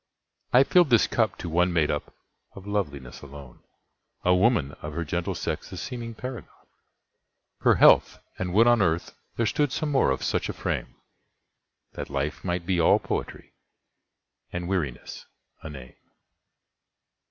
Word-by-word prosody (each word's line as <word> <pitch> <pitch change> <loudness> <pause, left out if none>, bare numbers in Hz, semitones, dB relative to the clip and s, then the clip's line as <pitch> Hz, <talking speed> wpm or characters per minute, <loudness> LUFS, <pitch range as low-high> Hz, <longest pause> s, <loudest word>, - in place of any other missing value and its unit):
I 125 +2 +7
filled 175 +2 +4
this 115 -3 +5
cup 110 -5 0
to - - -6
one 90 +2 +2
made 80 -3 +2
up 75 - -4 0.4
of 100 - -11
loveliness 75 -12 -4
alone,A 70 +5 -6
woman, 95 - +2
of 75 0 -6
her 85 +2 -3
gentle 85 +3 -2
sex - - -4
the - - -8
seeming 115 -2 -6
paragon—Her 125 +1 -5
health! - - +5 0.2
and 90 -1 -2
would 115 +2 +6
on 120 -2 +4
earth 85 -2 0 0.2
there 115 - +1
stood 145 +5 +1
some 155 +2 -2
more 135 - +3
of 65 - -1
such - - -1
a - - -2
frame, - - -4 1.0
That - - -6
life 75 +1 -3
might 90 -1 -2
be 90 -2 +1
all - - +5
poetry, - - -5 1.0
and 90 0 -4
weariness 85 -10 -4 0.3
a 80 - -8
name. 65 -4 -10
90 Hz, 145 wpm, -26 LUFS, 75-115 Hz, 1.0 s, I